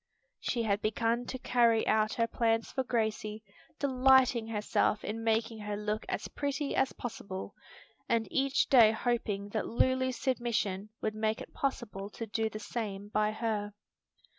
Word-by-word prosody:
She 235 Hz, -2 st, -1 dB
had 205 Hz, -1 st, +1 dB
begun 230 Hz, +2 st, 0 dB
to 260 Hz, -, -4 dB
carry 235 Hz, -3 st, +3 dB
out 215 Hz, 0 st, +2 dB
her 230 Hz, -, +2 dB
plans 230 Hz, -1 st, 0 dB
for 265 Hz, -, -1 dB
Gracie, 220 Hz, -3 st, -2 dB, 0.3 s
delighting 260 Hz, -3 st, +4 dB
herself 210 Hz, 0 st, +1 dB
in 225 Hz, +2 st, -4 dB
making 225 Hz, 0 st, 0 dB
her 210 Hz, -1 st, -4 dB
look 210 Hz, +1 st, -3 dB
as -, -, -2 dB
pretty 285 Hz, 0 st, -2 dB
as 265 Hz, -, +2 dB
possible, 200 Hz, -5 st, -6 dB, 0.6 s
and 230 Hz, -2 st, +2 dB
each 275 Hz, 0 st, +2 dB
day 235 Hz, -5 st, +7 dB
hoping 220 Hz, -4 st, -1 dB
that 215 Hz, +1 st, -2 dB
Lulu's 260 Hz, +1 st, +1 dB
submission 220 Hz, -6 st, -1 dB
would 215 Hz, -, -1 dB
make 215 Hz, +1 st, 0 dB
it -, -, -10 dB
possible 230 Hz, -8 st, -3 dB
to 230 Hz, -, -6 dB
do 220 Hz, +1 st, -1 dB
the 215 Hz, -, -6 dB
same 205 Hz, -2 st, -5 dB
by 210 Hz, 0 st, +1 dB
her. 215 Hz, -2 st, -2 dB
225 Hz, 155 wpm, -31 LUFS, 210-245 Hz, 0.6 s, day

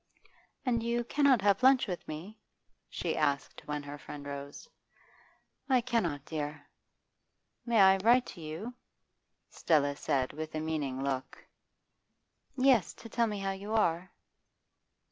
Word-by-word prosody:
'And 235 Hz, -3 st, +1 dB
you 235 Hz, +1 st, 0 dB
cannot 270 Hz, -3 st, +3 dB
have 200 Hz, +1 st, +3 dB
lunch 260 Hz, 0 st, +6 dB
with 180 Hz, -4 st, -5 dB
me?' 165 Hz, +8 st, -7 dB, 0.5 s
she -, -, -2 dB
asked 140 Hz, -3 st, -1 dB
when 150 Hz, -1 st, -3 dB
her 145 Hz, +1 st, -8 dB
friend 145 Hz, 0 st, -9 dB
rose. 140 Hz, 0 st, -7 dB, 1.0 s
'I 255 Hz, -2 st, +4 dB
cannot; 185 Hz, -, -1 dB
dear.' 150 Hz, -2 st, -5 dB, 1.0 s
'May 235 Hz, -2 st, +3 dB
I 190 Hz, 0 st, +7 dB
write 240 Hz, +6 st, +4 dB
to 170 Hz, -, -12 dB
you?' 160 Hz, +10 st, -6 dB, 0.8 s
Stella 145 Hz, -3 st, +2 dB
said 135 Hz, -3 st, -1 dB
with 155 Hz, +1 st, -6 dB
a -, -, -1 dB
meaning 145 Hz, -4 st, -2 dB
look. 135 Hz, -2 st, -4 dB, 1.1 s
'Yes, 255 Hz, -5 st, +3 dB
to 230 Hz, -, -11 dB
tell 230 Hz, +1 st, +1 dB
me 210 Hz, -1 st, -3 dB
how 195 Hz, 0 st, -2 dB
you 200 Hz, +3 st, -6 dB
are. 175 Hz, -4 st, +1 dB
175 Hz, 135 wpm, -31 LUFS, 145-230 Hz, 1.1 s, I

